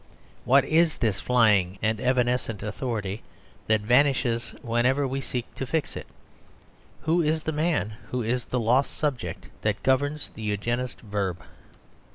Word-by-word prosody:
What 135 +2 +5
is 160 0 +3
this 110 -4 0
flying 105 -7 +3
and 110 +1 0
evanescent 125 -4 +1
authority 105 -2 -3 0.5
that 110 -1 +3
vanishes 120 0 +2
wherever 125 +4 +2
we 135 +1 -2
seek 125 -2 -4
to 135 - -5
fix 160 +1 -1
it? - - -7 1.0
Who 165 +2 +3
is 155 0 0
the 160 - -1
man 150 -8 0 0.2
who 125 -1 -1
is 120 +2 -1
the 125 - -1
lost 120 +4 +2
subject 120 - -2 0.2
that 105 -1 -1
governs 145 +3 +1
the - - -11
Eugenist's 120 +4 -2
verb? 100 -5 -3
125 Hz, 145 wpm, -26 LUFS, 110-135 Hz, 1.0 s, What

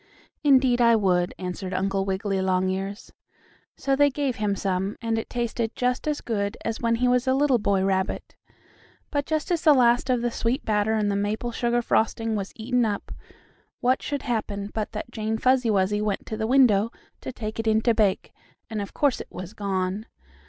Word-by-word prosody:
"Indeed 260 -4 +4
I 235 -1 +6
would," 180 -4 +1
answered 185 0 -5
Uncle 195 +1 0
Wiggily 195 0 -1
Longears. 190 +2 -1 0.6
So 275 0 +1
they 285 +1 +5
gave 275 -2 -2
him 210 -2 0
some, 195 +1 -2
and 225 -1 -1
it - - -7
tasted 235 -1 -2
just 250 +3 -1
as 300 -1 -1
good 205 -2 -2
as 225 -1 -3
when 230 -1 +2
he 250 +2 +1
was 250 +1 +2
a 260 - +3
little 275 -3 +3
boy 200 -2 +1
rabbit. 190 -1 -1 0.8
But 285 -1 -1
just 315 +3 -1
as 340 -3 +1
the 300 -2 +6
last 245 0 +3
of 245 -2 +1
the 240 - 0
sweet 235 +5 -1
batter 210 0 +1
and 210 -2 +1
the - - 0
maple 210 +4 -1
sugar 240 +1 0
frosting 225 0 +1
was 195 -2 -3
eaten 245 +2 0
up, 210 -3 -2 0.7
what 255 +2 +2
should 285 -2 -3
happen 210 -4 -3
but 215 -2 -3
that 215 +2 -6
Jane 220 -1 -2
Fuzzy 255 0 +2
Wuzzy 205 0 +1
went 210 -2 -2
to 220 - -4
the 220 0 -2
window 230 -4 +4 0.3
to - - -5
take 220 -3 -6
it 225 - -2
in 220 0 +4
to 235 0 +3
bake, 210 -4 +1 0.4
and 215 -2 -2
of 200 - -7
course 285 -4 +1
it - - -9
was 185 +1 -8
gone. 195 +1 -2
220 Hz, 195 wpm, -25 LUFS, 200-245 Hz, 0.8 s, I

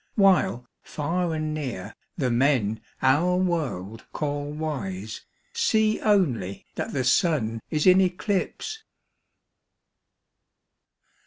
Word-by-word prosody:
While 190 - +3 0.2
far 165 +2 -2
and 155 -1 -2
near 120 -10 -5 0.2
the 130 -6 0
men 120 -4 +2 0.2
our 155 +8 +4
world 135 - -2
call 145 -1 -2
wise 110 -10 -4 0.3
See 220 0 +2
only 135 - +1
that - - -4
the 130 - -1
Sun 125 - +2
is 150 -1 0
in 185 0 +7
eclipse. 200 - -2
150 Hz, 95 wpm, -25 LUFS, 120-180 Hz, 0.3 s, in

